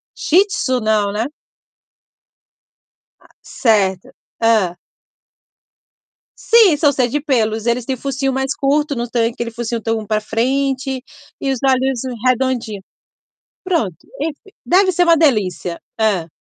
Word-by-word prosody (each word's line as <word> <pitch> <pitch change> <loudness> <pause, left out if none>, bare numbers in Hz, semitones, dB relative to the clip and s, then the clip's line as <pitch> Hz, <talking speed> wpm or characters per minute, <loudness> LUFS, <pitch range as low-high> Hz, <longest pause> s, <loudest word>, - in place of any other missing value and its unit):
Shih 370 +6 +3
Tzu 255 -9 -1
não, 215 -2 +1
né? 215 +3 -1 1.9
Ah, - - -23
certo. 195 -6 0 0.3
Hã. 210 -6 +2 1.6
Sim, 440 -9 +5
são 290 -2 +3
cheios 250 -3 0
de 295 - -1
pelos, 225 -6 0
eles 235 0 0
têm 265 - -2
focinho 270 +1 -2
mais 265 +1 -1
curto, 285 +1 0
não 240 0 -3
tem 230 0 0
aquele 235 0 -5
focinho 235 0 -4
tão 225 -1 -2
pra 215 +1 0
frente 265 +4 -1 0.4
e 270 - -1
os 260 - -2
olhos 265 -1 +2 0.3
redondinho. 250 -5 0 0.8
Pronto, 285 - -1 0.3
enfim, 325 +6 -5
deve 375 +1 +4
ser 355 +1 +2
uma 335 -1 +5
delícia. 195 - 0 0.2
Hã. 195 -7 +1
250 Hz, 130 wpm, -18 LUFS, 220-275 Hz, 1.9 s, Sim